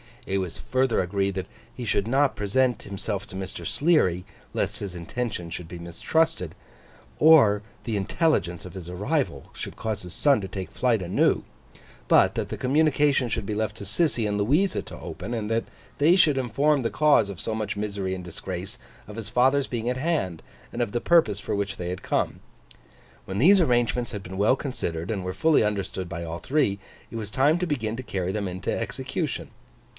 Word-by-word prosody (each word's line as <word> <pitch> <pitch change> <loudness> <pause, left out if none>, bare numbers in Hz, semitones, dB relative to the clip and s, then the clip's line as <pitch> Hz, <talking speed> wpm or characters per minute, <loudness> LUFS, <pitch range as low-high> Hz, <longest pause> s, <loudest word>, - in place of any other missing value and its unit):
It 95 0 0
was 90 -3 -4
further 130 -2 +1
agreed 95 +2 0
that 95 - -3 0.3
he 125 - -5
should 100 -1 +1
not 135 +3 +3
present 120 +4 +1
himself 100 0 -4
to - - -10
Mr. 95 0 -6
Sleary, 140 - +2 0.3
lest - - -1
his 100 -3 -5
intentions 90 -1 -4
should 90 -1 -6
be 90 - -8
mistrusted, 90 - 0 0.7
or 140 -11 +7 0.2
the 110 -3 -1
intelligence 95 - 0
of 90 - -9
his 90 -3 -8
arrival 100 - -2
should - - -6
cause 110 -2 -3
his 90 - -7
son 140 -4 +4
to 95 - -4
take 95 -1 -5
flight 120 -5 +1
anew; 90 0 +2 0.6
but, - - +5
that - - -2
the - - -4
communication 145 -1 +3
should 115 -2 -2
be 105 - -2
left 110 0 -2
to - - -7
Sissy 115 - +1
and 105 0 -1
Louisa 150 - +2
to - - -10
open; 105 +7 -6
and 110 -3 -2
that 115 0 +1 0.3
they 155 +5 +5
should 155 -7 +4
inform 135 +4 +2
the 115 - -1
cause 150 -9 +4
of 95 -4 -7
so 110 - -2
much 110 -2 -3
misery 100 -2 -2
and 90 - -7
disgrace, 90 +5 -6 0.3
of 105 +1 -9
his 110 -3 -5
father's 135 +4 +3
being 120 -1 -2
at 125 - -1
hand 135 - -1 0.3
and - - -3
of 115 -4 0
the 120 - 0
purpose 165 - +4
for - - -2
which 100 0 -2
they 90 -1 -4
had 90 +1 -5
come. - - 0 0.9
When 95 - -4
these 190 - +7
arrangements 120 -4 +1
had 100 -4 -5
been 95 +1 -7
well 105 +6 +4
considered 90 - -3
and 100 -4 -2
were 90 0 -3
fully 155 +9 +4
understood 100 -3 -2
by 85 0 -5
all 85 +1 -5
three, 130 -9 +1 0.3
it - - -8
was 105 -2 -5
time 145 +7 +3
to 180 - -1
begin 115 -8 -1
to 130 - -5
carry 95 -5 -2
them 100 0 -2
into 95 +1 -3
execution. - - -3
105 Hz, 195 wpm, -26 LUFS, 95-130 Hz, 0.9 s, or